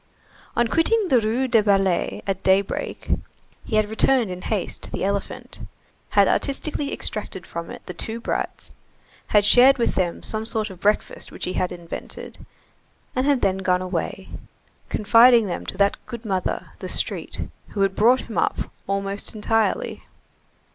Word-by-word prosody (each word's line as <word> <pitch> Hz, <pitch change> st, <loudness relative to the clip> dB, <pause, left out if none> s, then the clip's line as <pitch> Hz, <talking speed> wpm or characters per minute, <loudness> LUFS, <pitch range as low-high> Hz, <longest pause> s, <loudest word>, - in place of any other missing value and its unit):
On 240 Hz, 0 st, +3 dB
quitting 390 Hz, -, +2 dB
the 250 Hz, -5 st, +5 dB
Rue 230 Hz, +5 st, 0 dB
des 230 Hz, -3 st, +4 dB
Ballets 195 Hz, -3 st, +1 dB
at 195 Hz, -1 st, -2 dB
daybreak, 195 Hz, +1 st, 0 dB, 0.6 s
he 220 Hz, -, -2 dB
had 215 Hz, -1 st, +3 dB
returned 220 Hz, 0 st, +2 dB
in 180 Hz, 0 st, -6 dB
haste 210 Hz, -2 st, -3 dB
to -, -, -7 dB
the -, -, -3 dB
elephant, 200 Hz, +1 st, -3 dB, 0.5 s
had -, -, +4 dB
artistically 285 Hz, 0 st, -1 dB
extracted 195 Hz, -4 st, -3 dB
from 170 Hz, 0 st, -6 dB
it -, -, -10 dB
the 180 Hz, -, -6 dB
two 225 Hz, +6 st, -4 dB
brats, -, -, -3 dB, 0.5 s
had 205 Hz, -1 st, +4 dB
shared 255 Hz, +5 st, +7 dB
with 235 Hz, -, +1 dB
them 175 Hz, -3 st, -1 dB
some 220 Hz, 0 st, -2 dB
sort 220 Hz, -2 st, -2 dB
of 185 Hz, -, -12 dB
breakfast 210 Hz, +2 st, 0 dB
which -, -, -5 dB
he 185 Hz, -, -3 dB
had 180 Hz, -, -1 dB
invented, 175 Hz, -1 st, -8 dB, 0.7 s
and 255 Hz, +2 st, +1 dB
had 280 Hz, -3 st, +3 dB
then 190 Hz, -1 st, +1 dB
gone 185 Hz, -1 st, +1 dB
away, 185 Hz, +1 st, -4 dB, 0.6 s
confiding 230 Hz, +2 st, +6 dB
them 180 Hz, -, -4 dB
to -, -, -5 dB
that 200 Hz, +1 st, +1 dB
good 235 Hz, -1 st, -7 dB
mother, 190 Hz, -3 st, -2 dB
the -, -, -6 dB
street, -, -, -1 dB, 0.2 s
who 200 Hz, -, -4 dB
had 195 Hz, -1 st, +2 dB
brought 245 Hz, +4 st, +4 dB
him 225 Hz, -, -4 dB
up, -, -, -1 dB, 0.2 s
almost 195 Hz, +2 st, -1 dB
entirely. 220 Hz, +1 st, 0 dB
210 Hz, 160 wpm, -23 LUFS, 190-235 Hz, 0.7 s, shared